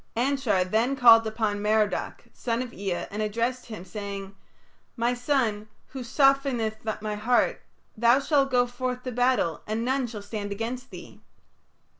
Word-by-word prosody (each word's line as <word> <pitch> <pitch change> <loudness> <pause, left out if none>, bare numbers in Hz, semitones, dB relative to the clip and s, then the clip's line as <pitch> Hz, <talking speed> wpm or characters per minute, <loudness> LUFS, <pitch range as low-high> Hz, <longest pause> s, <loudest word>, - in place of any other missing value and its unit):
Anshar 250 -6 +1
then 225 +8 +1
called 230 -4 +7
upon 215 -2 -1
Merodach, 210 0 0
son 235 0 -2
of 245 -1 -10
Ea, 190 -3 -3
and 210 +2 -3
addressed 230 +4 -2
him, 215 -6 -8
saying, 200 0 -6 0.6
"My 235 +1 +1
son, 245 -5 0 0.2
who 265 - -7
softeneth 260 -3 +1 0.2
my 215 -1 -2
heart, 225 +4 +1 0.3
thou 235 +4 +4
shalt 275 -1 +2
go 250 -1 +3
forth 250 +1 -4
to 255 - -4
battle 245 -8 +1
and 220 +2 -2
none 260 0 0
shall 215 -3 -8
stand 205 -1 -5
against 235 +5 -4
thee." - - -12
235 Hz, 150 wpm, -26 LUFS, 210-255 Hz, 0.6 s, called